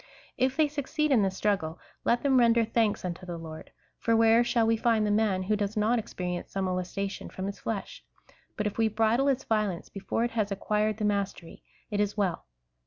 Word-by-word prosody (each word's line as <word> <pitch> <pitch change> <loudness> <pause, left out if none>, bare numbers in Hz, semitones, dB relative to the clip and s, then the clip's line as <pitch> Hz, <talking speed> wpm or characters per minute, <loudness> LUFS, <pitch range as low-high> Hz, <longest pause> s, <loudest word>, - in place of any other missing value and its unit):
If 260 +2 0
they 310 -1 +4
succeed 300 +1 -1
in 245 -5 +5
this 190 -1 0
struggle, 180 -6 0 0.3
let 240 - +2
them 270 -2 +4
render 235 -1 +4
thanks 220 -3 0
unto 180 +1 -5
the 175 -2 -5
Lord, 160 -1 -9 0.3
for 230 - +2
where 225 +1 +5
shall 235 -1 +2
we 225 0 +3
find 225 -1 +2
the 210 - +1
man 205 -3 +2
who 210 +3 +1
does 205 0 -2
not 225 +3 +2
ex 220 - -8
perience 180 -1 -4
some 195 -1 -2
molestation 185 +2 -3
from 190 - -5
his 200 0 -5
flesh? 220 -3 -5 0.5
but 210 - -1
if 210 +2 -3
we 225 - +4
bridle 225 +5 +2
its 270 -2 +1
violence, 210 -5 -1
before 200 +3 -2
it 240 - -1
has 215 -3 -1
acquired 210 +2 0
the 215 - -1
mastery, 200 -4 -2 0.3
it 205 - -1
is 205 0 0
well. 190 -5 -1
210 Hz, 210 wpm, -28 LUFS, 195-230 Hz, 0.5 s, in